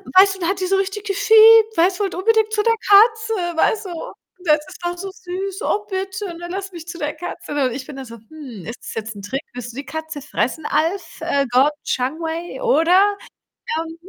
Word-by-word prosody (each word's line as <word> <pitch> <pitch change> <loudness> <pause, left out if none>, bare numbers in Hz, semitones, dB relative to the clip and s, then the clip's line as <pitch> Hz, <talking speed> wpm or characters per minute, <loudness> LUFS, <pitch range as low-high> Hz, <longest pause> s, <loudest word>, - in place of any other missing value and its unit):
weißt 385 +1 +7
du, 380 - -13
dann 340 - -1
hat 385 0 -1
die 370 - -1
so 390 - +2
richtig 390 +2 -2
gefiept, 440 +2 +6
weißt 360 +3 +3
du, 410 - +1
wollt 385 - -2
unbedingt 440 +3 +2
zu 425 - +1
der 460 0 +4 0.2
Katze, 445 +2 +6 0.2
weißt 420 +5 +2
du. 345 -3 -7 0.3
Das 300 -1 +4
ist - - -12
auch 350 0 -2
so 390 +2 -5
süß. 380 +2 -6
„Oh 415 0 0
bitte, 380 +1 -3
ne, 345 - -7
lass 390 +1 -5
mich 340 -1 -10
zu 340 - -7
der 295 -2 -3
Katze.“ 340 0 -8
Und 250 - -1
ich 260 0 -6
bin 285 - -9
da 270 - -7
so: 230 -1 -10
„Hm, 240 - -11
ist 230 - -7
das - - -8
jetzt 220 -1 -5
'n 200 - -9
Trick? 260 +8 -4
Willst 240 -1 -7
du - - -15
die 280 - -5
Katze 315 -2 -6
fressen, 290 +2 -2
Alf, 345 +5 -1
äh, 280 0 +1
Gordon 265 +4 +4
Changwei 325 - -3
oder, 400 -3 +4 0.6
ähm 325 0 -5
350 Hz, 220 wpm, -20 LUFS, 300-400 Hz, 0.6 s, weißt